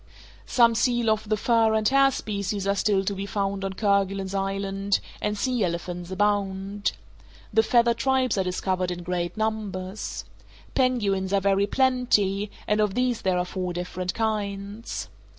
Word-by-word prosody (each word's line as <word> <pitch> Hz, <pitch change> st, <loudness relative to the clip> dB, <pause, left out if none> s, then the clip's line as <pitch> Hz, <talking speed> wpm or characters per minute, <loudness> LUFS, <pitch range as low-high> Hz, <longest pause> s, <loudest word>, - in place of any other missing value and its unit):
Some 235 Hz, -2 st, +5 dB
seal 240 Hz, -1 st, +2 dB
of 215 Hz, -1 st, -1 dB
the 215 Hz, -, +2 dB
fur 225 Hz, 0 st, +3 dB
and 215 Hz, -1 st, +2 dB
hair 275 Hz, 0 st, +5 dB
species 200 Hz, -5 st, -3 dB
are 200 Hz, -, +2 dB
still 200 Hz, -1 st, +1 dB
to 200 Hz, -, 0 dB
be 195 Hz, +1 st, -5 dB
found 200 Hz, -1 st, -2 dB
on 195 Hz, 0 st, -2 dB
Kerguelen's 195 Hz, -1 st, 0 dB
Island, 195 Hz, 0 st, -1 dB, 0.2 s
and 210 Hz, 0 st, -1 dB
sea 250 Hz, 0 st, 0 dB
elephants 175 Hz, 0 st, -3 dB
abound. 200 Hz, 0 st, 0 dB, 0.6 s
The 220 Hz, -, +6 dB
feathered 235 Hz, +1 st, +3 dB
tribes 260 Hz, 0 st, +2 dB
are 195 Hz, -, +1 dB
discovered 185 Hz, 0 st, -1 dB
in 175 Hz, 0 st, -5 dB
great 175 Hz, 0 st, -2 dB
numbers. 210 Hz, -3 st, -3 dB, 0.5 s
Penguins 205 Hz, -7 st, +1 dB
are 200 Hz, -, +3 dB
very 200 Hz, +1 st, +2 dB
plenty, 210 Hz, -6 st, +2 dB, 0.2 s
and 210 Hz, 0 st, +2 dB
of 210 Hz, -2 st, +1 dB
these 250 Hz, -2 st, +1 dB
there 185 Hz, -1 st, +1 dB
are 180 Hz, -, 0 dB
four 180 Hz, -1 st, -3 dB
different 180 Hz, +1 st, -4 dB
kinds. 200 Hz, -, -3 dB
200 Hz, 155 wpm, -25 LUFS, 190-220 Hz, 0.6 s, The